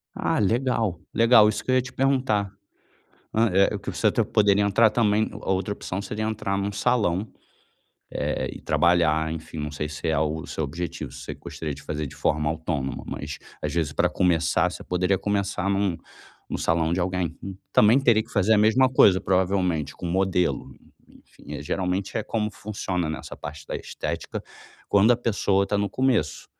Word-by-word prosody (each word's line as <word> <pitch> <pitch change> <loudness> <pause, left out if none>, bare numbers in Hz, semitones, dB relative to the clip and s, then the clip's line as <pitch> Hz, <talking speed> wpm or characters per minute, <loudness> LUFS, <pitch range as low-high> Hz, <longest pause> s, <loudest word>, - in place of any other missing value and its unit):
Ah, - - 0
legal, 110 -3 +1
legal. 115 -2 +6
Isso 110 - -1
que 130 - -1
eu - - +4
ia 130 - +4
te 125 - -10
perguntar. 130 -7 +1 0.8
Hã, 115 +1 +3
é 100 +3 +3
o - - -4
que 100 - -5
você 110 - +1
até 115 +2 +2
poderia 105 -2 +3
entrar 105 +2 +4
também 110 -1 +2
a - - -4
outra 95 +2 -1
opção 100 -1 -4
seria 105 +2 -4
entrar 110 -3 -2
num 100 +1 -1
salão, 105 -3 0 0.9
eh, - - -1
e - - -10
trabalhar, 80 -2 +2
enfim, 80 0 -7
não 75 0 -4
sei 75 +1 -3
se 75 +2 -6
é 80 -1 +1
o 80 +1 -1
seu 80 - -4
objetivo, 80 +3 -5
se - - -10
você - - -6
gostaria 75 -3 -6
de 70 - -13
fazer 75 0 -4
de 70 - -10
forma 75 +1 0
autônoma. 75 -4 -3
Mas - - -6 0.2
às - - -3
vezes 80 -3 0
para - - +2
começar 85 -3 +2
você - - -9
poderia 90 +1 +1
começar 100 -1 -1
num 100 -3 +1 0.5
no - - -2
salão 80 0 +1
de 90 - 0
alguém. 90 -2 -2 0.4
Também 110 +5 +6
teria 120 -5 +4
que 115 - -20
fazer 105 +1 +3
a - - +4
mesma 110 +5 +4
coisa, 100 -7 +5
provavelmente, 90 -4 0
com 90 - -6
modelo, 90 0 0 0.4
enfim. 75 - -13
Eh, 75 - -5
geralmente 95 +4 -2
é 110 - 0
como 105 -1 -1
funciona 95 -5 -3
nessa 80 - -7
parte 75 0 -8
da - - -5
estética, - - -5 0.5
quando 105 +3 +5
a 120 - +5
pessoa 100 -4 +1
está 105 - -1
no 100 -1 -1
começo. 125 - 0
95 Hz, 185 wpm, -25 LUFS, 80-110 Hz, 0.9 s, legal